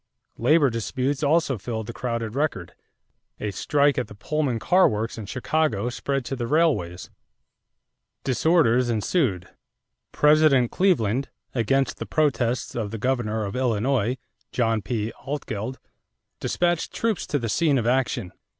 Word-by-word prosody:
Labor 145 +2 +4
disputes 130 +5 -2
also 145 -4 +2
filled 110 +1 -4
the 120 - -7
crowded 115 -3 -3
record. 135 - -2 0.7
A 105 - -2
strike 145 +5 +2
at 125 - -3
the - - -12
Pullman 145 +2 -1
car 185 +11 +4
works 110 +2 -3
in 110 -4 -7
Chicago 130 -4 0
spread 135 +1 -2
to 135 - -3
the 120 -2 -3
railways. 130 - +1 1.1
Disorders 130 -3 +3
ensued. 110 - 0 0.6
President 150 -5 +4
Cleveland, 135 - +1 0.2
against 135 +3 +1
the - - -6
protests 130 -6 0
of 110 -3 -3
the 115 - -5
governor 110 -3 -1
of 100 - -5
Illinois, 125 0 +1 0.3
John 115 -3 +1
P. 110 +2 -3
Altgeld, 130 -4 -4 0.6
dispatched 175 -1 0
troops 225 -5 -1
to 145 - 0
the 120 -4 -3
scene 145 +5 +2
of 115 - -1
action. 120 -5 0
125 Hz, 135 wpm, -24 LUFS, 110-145 Hz, 1.1 s, Labor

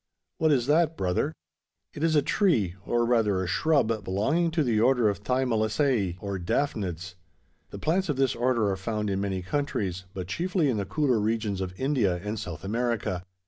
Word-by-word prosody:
"What 160 -1 +3
is 125 -5 +2
that, 160 +3 +2
brother?" 90 -1 0 0.6
"It 150 - -5
is 165 -1 +3
a 145 - +4
tree, 120 - +2
or 120 0 +2
rather 110 -6 +2
a - - -3
shrub, 115 - +1
belonging 135 - +1
to 160 -1 +1
the 115 -5 +1
order 120 -1 +4
of 100 -1 -3
the 105 - -25
Thymelaceae, 115 - +1
or 100 -1 -4
`Daphnads.' 90 - -2 0.6
The - - -8
plants 180 +3 0
of 145 - +1
this 135 -1 +2
order 120 -4 +1
are 95 - -2
found 105 +1 -2
in 95 0 -1
many 95 -2 -2
countries; 95 -7 -2
but 95 -2 -4
chiefly 170 - 0
in 115 - -1
the 100 - -2
cooler 130 +2 +1
regions 105 -2 -1
of 95 0 -5
India 130 -9 +1
and 105 +1 -3
South 90 -4 -7
America. 110 -4 -2
115 Hz, 185 wpm, -27 LUFS, 95-140 Hz, 0.6 s, a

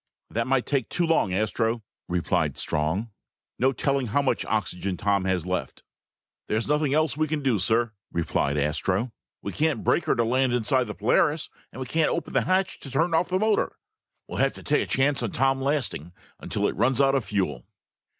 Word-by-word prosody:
"That 115 +2 -1
might 135 -1 +2
take 135 -6 -1
too 175 -1 0
long, 165 - +2
Astro," 110 +3 0 0.2
replied 90 -1 0
Strong. 80 +9 -1 0.5
"No 130 +2 +4
telling 135 0 0
how 140 +7 +1
much 135 - +1
oxygen 95 -3 -2
Tom 100 -2 +1
has 95 -3 0
left." 90 -7 -3 0.6
"There's 110 +2 0
nothing 150 -1 +2
else 155 -3 +2
we 155 +1 0
can 150 -1 -2
do, 125 -6 +2
sir," 110 +4 +1 0.2
replied 75 -3 0
Astro. 90 - 0 0.3
"We - - -3
can't 155 -1 0
brake 170 - +2
her - - +2
to 115 - +2
land 125 +2 +2
inside 125 +2 +2
the - - -6
Polaris 155 -1 +1 0.2
and - - -10
we 130 - -3
can't 160 +4 +1
open 170 - -3
the - - +2
hatch 185 0 +1
to 135 - -9
turn 165 +6 +1
off 165 +2 +2
the 185 - +1
motor. 215 +2 +1 0.5
We'll - - -5
have - - +3
to - - -11
take - - +2
a - - -3
chance 135 +1 +2
on 115 -5 -3
Tom 135 +1 +2
lasting 130 - -1 0.3
until - - -1
it - - -3
runs 130 +1 +2
out 135 -1 +4
of 135 -3 +1
fuel!" 85 - -2
125 Hz, 200 wpm, -26 LUFS, 100-145 Hz, 0.6 s, No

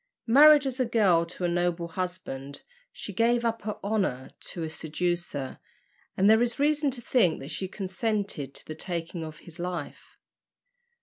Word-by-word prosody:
Married 290 +4 +8
as 265 -1 -2
a 255 - +3
girl 190 -8 +3
to 180 +1 -7
a - - +3
noble 175 -1 0
husband, 165 -7 -5 0.3
she 205 - -8
gave 235 +4 +2
up 230 0 0
her 210 0 -4
honour 195 -11 -1
to 170 - -6
a - - -2
seducer, 160 -3 -3 0.6
and 195 - +4
there 220 +2 +6
is 240 -1 +1
reason 295 0 +2
to 250 -2 -6
think 205 -12 +3
that 135 +4 -8
she 190 - -3
consented 195 - -3
to - - -4
the 155 - -6
taking 170 +1 -4
of 155 -1 -8
his 170 0 -13
life. 175 -4 -6
185 Hz, 170 wpm, -27 LUFS, 165-230 Hz, 0.6 s, Married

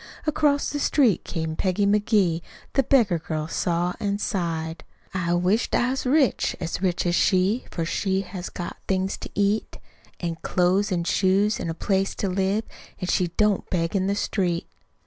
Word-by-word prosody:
Across 295 -2 +2
the 290 - -2
street 250 - +3
came 160 -2 -3
Peggy 190 +3 +1
McGee; 200 -4 +2 0.3
The 275 - +4
beggar 230 -10 +3
girl 155 -1 -3
saw 175 +1 0
an' 200 -1 -1
sighed. 165 -5 -2 0.3
"I 175 -2 0
wish'd 185 +6 +1
I 245 +1 +2
was 265 -1 -2
rich 275 -1 +2
as 170 0 -3
rich 180 -2 0
as 175 - +1
she, 190 +6 +2
For 165 - -3
she 190 +3 0
has 185 -1 -6
got 175 - -6
things 190 0 0
to - - -7
eat; 205 +2 0 0.4
An' 170 -2 -3
clo's 190 +3 +2
an' 175 -2 0
shoes, 195 +4 +2
an' - - -3
a 165 - -3
place 195 +2 0
to 200 - -2
live, 195 +3 0 0.4
An' 180 -2 -3
she 180 - +2
don't 210 -2 +2
beg 165 0 -1
in 190 -1 +1
the 200 - +1
street." 180 -4 -1
190 Hz, 175 wpm, -24 LUFS, 175-210 Hz, 0.4 s, The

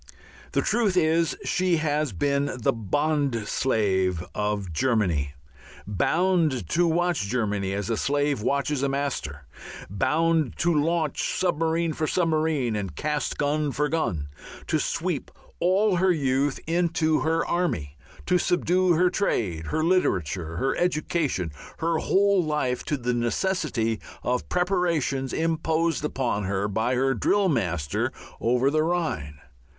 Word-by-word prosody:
The - - +2
truth 210 -6 +1
is, 165 0 +2
she 180 -2 +1
has 150 -2 0
been 140 +9 0
the 115 - +2
bond 140 0 0
slave 95 -9 +1
of 105 -4 -2
Germany, 85 - 0 0.5
bound 155 - +1
to 175 0 +2
watch 170 - +1
Germany 105 -4 -1
as 100 -1 -3
a 115 - 0
slave 145 0 0
watches 140 +3 0
a 140 - +1
master, 130 - -3 0.5
bound 155 - +1
to 175 0 +2
launch 155 0 0
submarine 165 -2 +1
for 155 - -2
submarine 155 -9 +1
and 95 -7 -4
cast 150 - -2
gun 150 0 0
for 150 +2 0
gun, 85 - -1 0.4
to - - 0
sweep - - -2 0.3
all 190 +2 +3
her 185 +2 +3
youth 140 -3 +1
into 165 -1 +1
her 165 +2 +1
army, 85 - -1 0.3
to 180 0 +3
subdue 180 0 +2
her 180 +2 +3
trade, 90 - -1
her 155 - -1
literature, 90 - 0
her 135 +9 0
education, 155 - 0 0.3
her 165 0 0
whole 200 0 +3
life 150 -5 -1
to 150 - -1
the 125 -1 -1
necessity 120 - 0 0.2
of 125 0 -1
preparations 170 -8 0
imposed 160 0 0
upon 125 -8 -1
her 100 +1 -1
by 110 +5 0
her 135 +1 +2
drill 200 +7 +2
master 90 - -1 0.3
over 125 +4 +2
the 155 +1 +2
Rhine. 155 - -1
145 Hz, 135 wpm, -25 LUFS, 110-165 Hz, 0.5 s, all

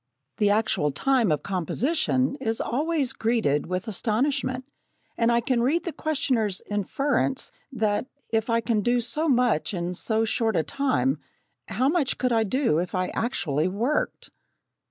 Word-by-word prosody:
The 205 - +3
actual 210 -8 +2
time 235 - +2
of 150 - 0
composition 255 - 0
is 225 -5 -2
always 290 +1 0
greeted 220 -11 +1
with 185 +5 -3
astonishment, 255 +5 -1 0.5
and 230 0 +2
I 235 0 +3
can 235 0 +1
read 310 +8 +1
the 340 - -4
questioner's 255 -10 0
inference, 265 +6 0 0.2
that 215 -1 0 0.3
if 225 +1 +1
I 230 0 +2
can 225 -2 +1
do 240 +4 +2
so 270 +7 -1
much 245 - +2
in 175 0 -2
so 220 +4 0
short 225 -1 0
a 165 - +2
time, 275 - 0 0.5
how 255 - 0
much 300 -3 +1
could 255 -1 0
I 225 -1 +3
do 225 - +1
if 180 +2 -3
I 185 0 0
actually 170 - -1
worked! 230 +10 -1
235 Hz, 155 wpm, -25 LUFS, 205-265 Hz, 0.5 s, The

